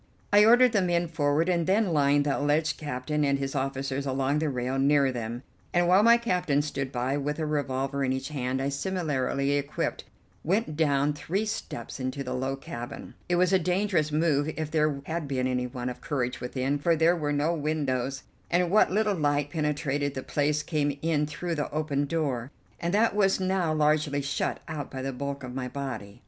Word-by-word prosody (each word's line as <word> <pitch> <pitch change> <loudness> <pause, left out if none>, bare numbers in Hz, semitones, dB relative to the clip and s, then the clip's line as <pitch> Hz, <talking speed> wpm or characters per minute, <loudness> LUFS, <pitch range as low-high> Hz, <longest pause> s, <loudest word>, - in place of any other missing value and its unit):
I 205 0 +8
ordered 245 +2 +6
the 205 -3 +2
men 175 -1 +1
forward 155 0 +1
and 170 -3 +1
then 195 -2 +2
lined 145 -1 +3
the 145 - +1
alleged 150 +2 +1
captain 150 +1 -2
and 140 -1 +2
his 135 0 -3
officers 135 0 -2
along 135 +2 0
the 155 -1 0
rail 130 0 -2
near 140 -1 +4
them, 120 0 -5 0.3
and, 175 0 +4
while 185 +3 +6
my 235 +2 +7
captain 180 -11 +1
stood 140 -3 -3
by 130 +2 -1
with 145 +1 -2
a 160 - -1
revolver 140 -2 -1
in 130 - +1
each 130 +1 -3
hand, 130 -2 -2
I, 140 - 0
similarly 140 -3 -1
equipped, 145 0 -2 0.4
went 190 -1 0
down 145 -2 +2
three 180 +8 -2
steps 140 - -5
into 130 +2 -3
the 125 - -4
low 130 +1 -1
cabin. 120 -3 -8 0.2
It 175 - +3
was 180 +1 +3
a 190 - +5
dangerous 180 -3 +1
move 155 -1 +1
if 155 -1 -3
there 150 -3 +1
had 160 -2 -3
been 130 -2 -1
anyone 125 -1 -2
of 125 - -5
courage 130 -4 -2
within, 130 +3 -1
for 165 +3 +2
there 165 +2 +4
were 150 -3 -2
no 145 +3 +1
windows, 140 -4 -1 0.3
and 175 0 +2
what 215 - +5
little 210 +2 +1
light 145 -4 0
penetrated 145 -3 -1
the 130 - -4
place 145 0 0
came 145 -3 -1
in 155 -2 +1
through 170 +3 -4
the 150 -2 -2
open 145 -2 -1
door, 140 -5 -2 0.3
and 170 - -1
that 220 0 +3
was 195 -2 +3
now 185 -3 +1
largely 150 -2 +1
shut 140 - -2
out 155 -4 -5
by 130 -1 -6
the 135 0 -3
bulk 140 +1 -4
of 125 -1 -6
my 130 -1 -3
body. 125 -7 -6
145 Hz, 195 wpm, -27 LUFS, 135-165 Hz, 0.4 s, I